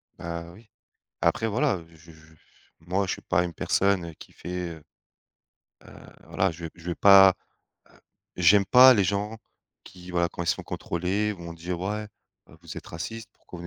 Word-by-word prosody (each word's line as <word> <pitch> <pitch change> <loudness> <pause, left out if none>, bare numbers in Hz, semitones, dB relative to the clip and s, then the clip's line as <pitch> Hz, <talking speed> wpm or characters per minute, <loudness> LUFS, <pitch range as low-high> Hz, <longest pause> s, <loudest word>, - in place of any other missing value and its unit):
Bah, 85 0 -6
oui, 110 +4 -18 0.5
après 115 - +1
voilà, 115 - 0
je 80 0 -18
je 80 0 -20 0.5
moi, 95 +4 -1
je - - -2
suis - - -7
pas 90 +1 +1
une 85 - -5
personne, 95 0 0
heu, 80 - -9
qui - - -14
fait, 90 -1 -6
heu 80 -2 -11 1.0
heu, - - -14 0.3
voilà, 95 -1 0
je 85 +1 -9
je 85 - -16
vais 85 - -2
pas 95 -1 +7 0.6
heu, - - -23 0.4
j'aime 95 +3 +5
pas 130 +3 +8
les 100 - +2
gens 100 +4 -2 0.5
qui, 90 0 -13
voilà, 85 -1 +1
quand 85 - -6
ils - - -7
sont - - 0
contrôlés 95 +5 -2
vont 85 -4 -9
dire: 85 +1 -6
«Ouais, 105 +3 -3 0.4
heu, - - -17
vous - - -10
êtes - - -9
raciste, 100 +7 -7
pourquoi 90 - -13
vous» 85 - -8
90 Hz, 185 wpm, -26 LUFS, 85-100 Hz, 1.0 s, pas